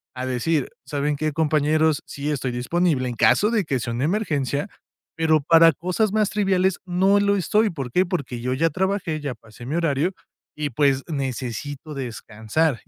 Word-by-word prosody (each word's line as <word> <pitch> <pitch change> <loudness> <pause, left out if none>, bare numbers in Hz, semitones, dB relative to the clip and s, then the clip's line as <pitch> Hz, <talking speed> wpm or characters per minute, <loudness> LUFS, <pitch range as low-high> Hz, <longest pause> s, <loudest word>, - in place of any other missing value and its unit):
a 130 0 -4
decir: 130 +4 0 0.2
"¿Saben 145 0 -1
qué, 155 0 -1
compañeros? 155 0 +2
Sí, 145 +2 -4
estoy 130 -3 -2
disponible 130 +2 0
en 120 - -5
caso 210 - +4
de 215 -5 +1
que 135 -4 -1
sea 120 - -3
una 125 +5 -1
emergencia, 155 - -1 0.5
pero 160 -2 +3
para 165 +1 +6
cosas 185 - -1
más 215 -2 +2
triviales 190 -3 +1
no 190 +3 +3
lo 200 0 +2
estoy". 210 +5 +2
¿Por 135 -7 -6
qué? 185 +6 +3
Porque 140 -9 -3
yo 125 +1 -1
ya 165 +5 +2
trabajé, 190 -2 -1
ya 140 -4 -4
pasé 115 +2 -14
mi 140 +6 -3
horario 165 +1 +1 0.4
y 150 -1 -2
pues 135 +1 +2
necesito 140 +1 -4
descansar 120 +2 -2
y - - -34
150 Hz, 175 wpm, -23 LUFS, 130-180 Hz, 0.5 s, para